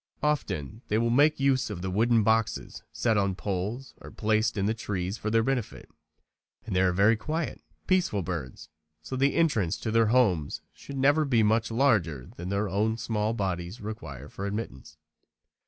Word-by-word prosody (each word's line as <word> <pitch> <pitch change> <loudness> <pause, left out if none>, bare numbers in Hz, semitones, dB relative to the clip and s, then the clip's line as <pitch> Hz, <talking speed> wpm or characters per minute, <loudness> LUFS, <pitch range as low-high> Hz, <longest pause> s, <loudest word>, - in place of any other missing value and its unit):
Often 115 - -1
they 105 - +1
will 115 +1 +1
make 145 +5 +4
use 135 -3 +2
of 95 -4 -6
wooden 110 +4 +2
boxes 110 +1 0
set 115 -3 +1
on 100 -2 +1
poles 105 +7 -4
or - - -9
placed 110 +1 0
in 100 - +1
the 110 - +2
trees 100 -4 -3
for 110 - -2
their 115 +1 +3
benefit. 125 -3 -3 0.8
They 95 -4 +1
are 95 -1 +3
very 100 +5 +4
quiet, 155 +8 -3 0.2
peaceful 175 - +1
birds, 80 -3 -6 0.3
so 130 - -5
the 140 +2 +2
entrance 110 - +2
to 110 - -3
their 115 0 +4
homes 105 - +2
should 140 - -9
never 145 +4 +4
be 120 -6 +3
much 110 +2 +2
larger 110 - +1
than 90 +2 -6
their 100 +2 0
own 105 +4 0
small 110 -1 -1
bodies 95 0 -3
require 105 - -7
for 100 - -5
admittance. 80 - -6
110 Hz, 170 wpm, -28 LUFS, 95-120 Hz, 0.8 s, make